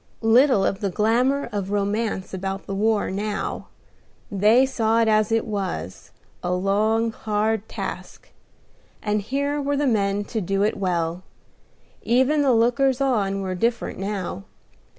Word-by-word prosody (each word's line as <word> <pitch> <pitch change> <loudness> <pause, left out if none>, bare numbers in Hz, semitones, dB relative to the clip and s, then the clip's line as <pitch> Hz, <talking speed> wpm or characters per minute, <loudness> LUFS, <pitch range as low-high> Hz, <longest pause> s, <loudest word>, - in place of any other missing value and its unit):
Little 230 -2 +5
of 195 - -1
the 200 - -1
glamour 240 +8 +1
of 200 -2 -3
romance 205 -1 -1
about 195 +1 -4
the 195 - -5
war 210 +1 +1
now: 205 +2 -3 0.6
they 215 +6 +4
saw 230 -4 +1
it 230 - +3
as 215 0 +2
it 225 0 +1
was, 190 - -4 0.3
a 180 - -2
long, 215 +5 +1
hard 215 0 -1
task; - - -7 0.7
and 210 -1 0
here 280 +6 -1
were 285 0 -1
the 290 - +1
men 205 -4 +1
to 220 +1 -4
do 195 +2 0
it 210 - +1
well. 175 -3 -1 0.8
Even 260 +5 +2
the 275 -2 +3
lookers 245 +3 +2
on 200 -8 0
were 185 -1 -3
different 230 +4 -1
now. 195 - -4
215 Hz, 145 wpm, -23 LUFS, 195-235 Hz, 0.8 s, Little